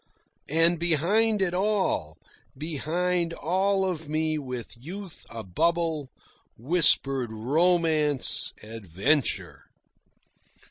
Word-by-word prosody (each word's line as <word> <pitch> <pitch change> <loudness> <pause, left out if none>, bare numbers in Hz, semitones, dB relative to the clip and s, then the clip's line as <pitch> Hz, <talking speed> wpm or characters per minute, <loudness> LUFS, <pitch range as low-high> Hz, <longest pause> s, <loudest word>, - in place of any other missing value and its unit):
And 165 +2 +3
behind 195 +6 +2
it 175 -2 -1
all, 190 - -1 0.4
behind 170 +3 -1
all 190 +5 0
of 160 -4 -5
me 155 0 0
with 125 -4 -7
youth 175 +8 -10
abubble, 155 - -1 0.5
whispered 135 -3 +3
Romance, 155 +3 +1
Adventure. 110 - -1
160 Hz, 80 wpm, -26 LUFS, 135-180 Hz, 0.5 s, And